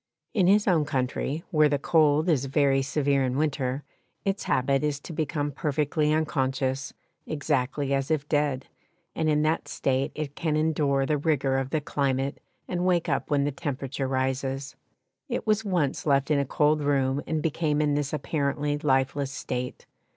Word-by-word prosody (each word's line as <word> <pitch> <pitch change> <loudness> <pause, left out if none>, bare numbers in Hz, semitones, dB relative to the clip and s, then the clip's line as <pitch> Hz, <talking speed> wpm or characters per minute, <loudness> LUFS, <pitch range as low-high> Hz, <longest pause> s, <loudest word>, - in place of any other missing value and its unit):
In 190 -6 +3
his 205 +2 +4
own 170 -5 +4
country, 140 +2 -2
where 155 -2 +4
the 145 - +1
cold 155 +1 +3
is 145 -6 +2
very 135 0 +2
severe 140 0 +1
in 130 0 -1
winter, 140 -2 -1 0.4
its 195 0 -1
habit 135 +2 +1
is 150 -1 0
to 165 - -8
become 150 -1 -1
perfectly 150 +1 0
unconscious, 135 -3 0 0.4
exactly 140 -2 -1
as 135 +1 0
if 150 -2 0
dead, 145 -3 0 0.5
and 160 -1 0
in 150 0 +2
that 155 +1 0
state 135 0 0
it 150 -2 -4
can 155 -2 -1
endure 150 -3 +1
the 150 +1 0
rigour 140 -3 +1
of 135 -1 -3
the 155 +2 0
climate 135 -1 -1 0.3
and 180 -1 -2
wake 180 -2 +2
up - - -1
when 145 -2 +2
the 145 - 0
temperature 135 -2 -3
rises. 135 +1 -2 0.5
It 245 - -2
was 215 0 +2
once 175 -9 -1
left 140 +1 +2
in 145 - +4
a 140 - +1
cold 150 +2 +2
room 140 -1 +1
and 160 0 0
became 155 -1 0
in 150 -1 +2
this 145 -1 -1
apparently 145 -1 -1
lifeless 135 -1 +1
state. 125 -2 -5
145 Hz, 170 wpm, -26 LUFS, 135-155 Hz, 0.5 s, his